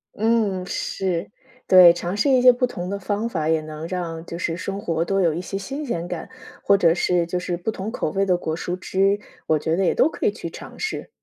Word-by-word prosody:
嗯， 215 -4 +1
是， 185 -1 -2 0.4
对， 180 -2 +9
尝 175 +2 -3
试 245 +7 +2
一 260 -2 +5
些 250 0 +8
不 250 +1 0
同 180 -6 -6
的 200 +1 -3
方 205 +3 -2
法， 160 -8 -2
也 160 -1 +2
能 155 +1 -7
让 170 -3 -4
就 170 - -6
是 170 -2 -2
生 195 +3 -4
活 165 -4 -1
多 195 +3 0
有 165 -3 +3
一 170 - -3
些 195 +1 -5
新 275 +9 -5
鲜 175 -6 -3
感， 175 -2 -6 0.3
或 200 - +5
者 170 -4 +4
是 175 0 +1
就 180 +2 -2
是 180 -1 -3
不 180 +6 -2
同 205 +2 -5
口 155 - -2
味 195 0 +1
的 180 -2 +2
果 160 -2 -3
蔬 175 +2 -4
汁， 195 +2 +1 0.3
我 155 - +3
觉 160 +2 -1
得 195 - +1
也 180 - +2
都 - - +4
可 320 - -2
以 - - +3
去 - - -7
尝 - - -10
试。 435 - -4
180 Hz, 260 characters per minute, -23 LUFS, 170-200 Hz, 0.4 s, 对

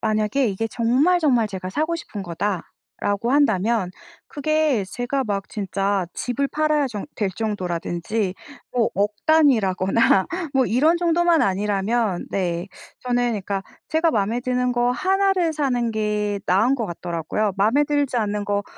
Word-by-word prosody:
만약에 215 +4 +1
이게 205 +3 -2
정말 265 +10 +2
정말 245 -8 +3
제가 185 -2 -6
사고 315 - -1
싶은 215 -11 -6
거다라고 200 +4 -3
한다면 220 -7 +2 0.4
그게 300 -6 0
제가 245 +7 -2
막 200 -2 -3
진짜 195 -2 -1
집을 265 +3 -2
팔아야 305 -1 +1
정 210 0 -6
될 205 -4 -1
정도라든지 185 -1 -2 0.4
뭐 240 -3 +2
억 205 +2 +1 0.2
단위라거나 220 -10 +3 0.3
뭐 265 -1 +4
이런 300 +9 +3
정도만 345 -1 +3
아니라면 200 +1 0
네, 175 -1 -1 0.3
저는 245 -1 0
그러니까 200 -2 -3 0.3
제가 320 +1 +2
마음에 220 +1 0
드는 250 0 0
거 245 0 +2
1 385 +9 +2
를 345 -4 +1
사는 250 -6 0
게 210 -1 -1
나은 215 +9 +3
것 235 -5 -2
같더라고요. 175 +4 -2
마음에 225 +9 +3
들지 285 -3 0
않는 210 -2 -1
거 205 0 0
225 Hz, 295 characters per minute, -22 LUFS, 200-275 Hz, 0.4 s, 뭐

